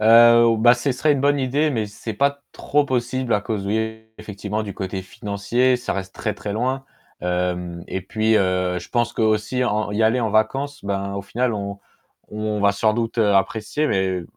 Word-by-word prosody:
Heu, 115 Hz, +1 st, +7 dB
bah, 120 Hz, +2 st, +6 dB
ce 125 Hz, +3 st, -1 dB
serait 150 Hz, +4 st, +2 dB
une 140 Hz, -, 0 dB
bonne 145 Hz, 0 st, +3 dB
idée, 140 Hz, +4 st, +1 dB
mais 110 Hz, -5 st, -1 dB
c'est 105 Hz, +2 st, -7 dB
pas 140 Hz, +5 st, 0 dB
trop 145 Hz, 0 st, +1 dB
possible 130 Hz, -1 st, -1 dB
à 105 Hz, -, +3 dB
cause, 105 Hz, -2 st, -3 dB
oui, 110 Hz, +2 st, -2 dB, 0.2 s
effectivement 105 Hz, +1 st, -4 dB
du 100 Hz, -3 st, -6 dB
côté 95 Hz, -1 st, -4 dB
financier, 105 Hz, +7 st, 0 dB
ça 125 Hz, -, -3 dB
reste 95 Hz, -1 st, -5 dB
très 105 Hz, -, -3 dB
très 105 Hz, -, -5 dB
loin. 130 Hz, +5 st, -1 dB, 0.4 s
Hem 90 Hz, -1 st, -2 dB
et 95 Hz, -, -3 dB
puis, 110 Hz, +4 st, +1 dB
heu, 90 Hz, -2 st, +1 dB
je 85 Hz, -, -11 dB
pense 120 Hz, -1 st, 0 dB
qu'aussi 110 Hz, +3 st, +1 dB
en 105 Hz, -3 st, 0 dB
y 105 Hz, +2 st, +1 dB
aller 115 Hz, +3 st, +3 dB
en 115 Hz, -, 0 dB
vacances, 135 Hz, +6 st, 0 dB
ben, 100 Hz, 0 st, -2 dB
au 100 Hz, -, -4 dB
final 120 Hz, +4 st, -1 dB
on 100 Hz, -1 st, -4 dB, 0.5 s
on 105 Hz, 0 st, -3 dB
va 100 Hz, 0 st, +4 dB
sans 110 Hz, +2 st, +2 dB
doute 115 Hz, +1 st, -2 dB
apprécier 105 Hz, +7 st, +1 dB
mais 95 Hz, -6 st, 0 dB
110 Hz, 190 wpm, -22 LUFS, 100-125 Hz, 0.5 s, Heu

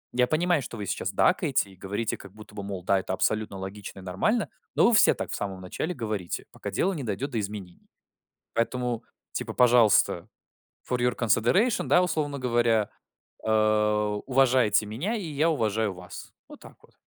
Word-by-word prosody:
я 125 Hz, 0 st, +3 dB
понимаю, 170 Hz, +1 st, +2 dB
что 120 Hz, -2 st, -7 dB
вы 105 Hz, -, -4 dB
сейчас -, -, -2 dB
дакаете 100 Hz, -, +2 dB
и -, -, -16 dB
говорите 100 Hz, +4 st, -3 dB
как 100 Hz, -1 st, -13 dB
будто 105 Hz, 0 st, -14 dB
бы, 105 Hz, -, -5 dB
мол, 100 Hz, -2 st, -5 dB
да, 95 Hz, +1 st, +3 dB
это 95 Hz, 0 st, -4 dB
абсолютно 110 Hz, +1 st, 0 dB
логично 95 Hz, +2 st, -7 dB
и -, -, -10 dB
нормально. 150 Hz, -, 0 dB, 0.3 s
Но -, -, +5 dB
вы 240 Hz, -, +3 dB
все 215 Hz, -, +6 dB
так -, -, -5 dB
в -, -, -2 dB
самом 95 Hz, -2 st, -4 dB
начале 155 Hz, -, -4 dB
говорите, 105 Hz, -6 st, -4 dB
пока -, -, -6 dB
дело 195 Hz, -, +1 dB
не 155 Hz, -, -4 dB
дойдет 120 Hz, +6 st, -3 dB
до 115 Hz, -, -1 dB
изменений. 100 Hz, -4 st, -7 dB, 0.7 s
Поэтому, 120 Hz, 0 st, -1 dB, 0.3 s
типа, -, -, -4 dB
пожалуйста, 115 Hz, -6 st, +4 dB, 0.6 s
for 125 Hz, -, +1 dB
your 125 Hz, -1 st, +1 dB
consideration, 120 Hz, -, +2 dB
да, 180 Hz, -, +5 dB
условно 150 Hz, -5 st, -1 dB
говоря, 120 Hz, -3 st, +2 dB, 0.6 s
э, 110 Hz, -, +1 dB, 0.7 s
уважайте 125 Hz, -5 st, +3 dB
меня, 140 Hz, -, -3 dB
и 200 Hz, -, -5 dB
я 155 Hz, +4 st, +2 dB
уважаю 110 Hz, -7 st, 0 dB
вас". 90 Hz, 0 st, -10 dB, 0.2 s
Вот -, -, -13 dB
так -, -, -14 dB
вот. -, -, -23 dB
115 Hz, 180 wpm, -27 LUFS, 100-135 Hz, 0.7 s, все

